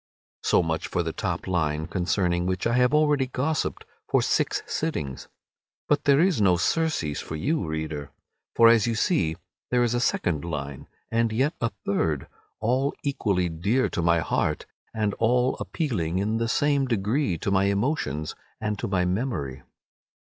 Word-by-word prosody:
So - - +3
much 80 -1 -2
for - - -1
the - - -3
top - - -3
line, 80 -4 0
concerning 90 0 0
which 95 0 -1
I 115 - +2
have 125 0 +4
already 150 -3 +3
gossipped 140 +5 -2 0.2
for - - +3
six - - +1
sittings, 75 - -3 0.6
but 145 0 +1
there 140 -1 +5
is 175 - +3
no 90 -3 +4
surcease 145 - 0
for 80 - -6
you, 145 - -1
reader, 80 -2 -4 0.5
for 115 - +7
as 115 -1 +5
you 115 - 0
see 110 - +1 0.3
there 125 -1 +3
is 120 -1 +1
a 120 - +1
second 85 -10 0
line, 70 -5 -5 0.2
and 115 0 +2
yet 135 +7 +1
a 115 - +1 0.2
third, 80 -8 0 0.3
all 130 +5 +1
equally 100 -10 0
dear 100 +11 0
to - - -2
my 85 0 +3
heart, 75 -1 -1 0.3
and 105 -2 -1
all 125 +3 +2
appealing 95 - -2
in 105 +3 0
the 115 0 -1
same 140 +1 +2
degree 110 - 0
to 100 - -2
my 95 0 +3
emotions 100 - -1 0.3
and 105 -1 -2
to - - -2
my 90 -2 +1
memory. 90 - -2
105 Hz, 165 wpm, -26 LUFS, 85-130 Hz, 0.6 s, for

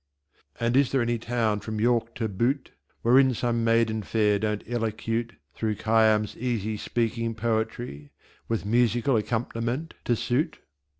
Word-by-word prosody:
And 115 +1 +1
is 140 -1 +4
there 135 -3 +2
any 120 0 0
town 115 -2 0
from 110 0 -5
York 115 0 +1
to 115 - -1
Butte 120 +7 -1 0.3
Wherein 130 +2 +5
some 115 0 0
Maiden 115 -1 +2
fair 105 -1 +1
don't 105 0 -2
Elocute 115 0 -2 0.2
Through 110 -1 -1
Khayyam's 110 -1 +2
easy 110 -3 -1
speaking 115 +1 -1
poetry, 110 -9 -2 0.4
With 115 -3 -2
Musical 120 +4 +2
Accomp'niment 115 +6 -1
to 120 - +2
suit? 125 +8 -1
115 Hz, 135 wpm, -26 LUFS, 110-120 Hz, 0.4 s, Wherein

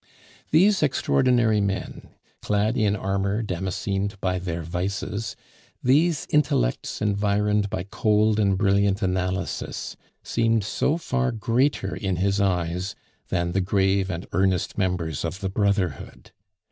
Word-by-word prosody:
These 190 +5 +4
extraordinary 125 -6 +2
men, 100 -1 -3 0.3
clad 105 +3 +1
in 105 -4 +2
armor 100 +2 -1
damascened 95 +1 -3
by 90 -1 -1
their 85 -2 -4
vices, 100 +5 -3 0.5
these 150 +5 +3
intellects 125 - +1
environed 105 0 +1
by 90 - -3
cold 105 +2 +2
and 100 -2 +2
brilliant 100 +1 +2
analysis, 95 +1 -2 0.3
seemed 115 -2 +1
so 145 +9 0
far 135 -6 -1
greater 115 -1 0
in 95 -2 -2
his 100 +3 +1
eyes 90 0 -1 0.3
than 85 0 -1
the 95 +2 +1
grave 95 0 +1
and 85 -1 -4
earnest 95 +2 +1
members 90 -6 -1
of 85 +3 -3
the 95 -1 -2
brotherhood. 100 -4 -1
100 Hz, 120 wpm, -24 LUFS, 95-110 Hz, 0.5 s, These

